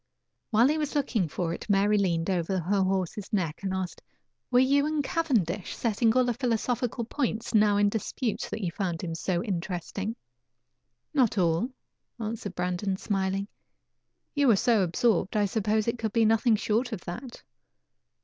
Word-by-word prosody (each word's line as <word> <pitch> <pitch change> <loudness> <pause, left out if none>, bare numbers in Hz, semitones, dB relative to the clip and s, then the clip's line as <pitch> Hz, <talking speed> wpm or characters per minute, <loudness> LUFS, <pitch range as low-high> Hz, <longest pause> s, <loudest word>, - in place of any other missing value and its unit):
While 230 +3 +5
he 310 +1 +1
was 300 0 -2
looking 235 - +1
for 165 +2 -2
it - - -8
Mary 200 +1 +3
leaned 170 -5 +1
over 180 +1 0
her 190 +3 +1
horse's 190 +1 -1
neck 170 -6 -1
and 195 -1 -2
asked: 190 -1 -4 0.5
"Were 245 - +3
you 280 +3 +4
and 305 -1 0
Cavendish 240 - 0
settling 225 0 +1
all 255 - +5
the 245 - +1
philosophical 240 0 -1
points 235 -3 -2
now 210 -2 +4
in 205 0 +4
dispute, 220 +3 -2
that 220 - -4
you 175 - -1
found 175 -2 -3
him 165 -2 -3
so 175 +2 -1
interesting?" 195 +2 -3 1.0
"Not 245 -7 +2
all," 170 +5 +2 0.5
answered 215 -3 -4
Brandon, 180 +2 -1
smiling. 195 0 -1 0.9
"You 285 -2 +2
were 230 - +6
so 225 +1 +3
absorbed, 190 +3 +1
I 205 - +3
supposed 215 +1 0
it 230 0 -1
could 220 -2 -2
be 230 -1 +4
nothing 225 +1 +4
short 225 +4 0
of 210 -5 -4
that." 240 +8 -8
210 Hz, 165 wpm, -28 LUFS, 185-235 Hz, 1.0 s, were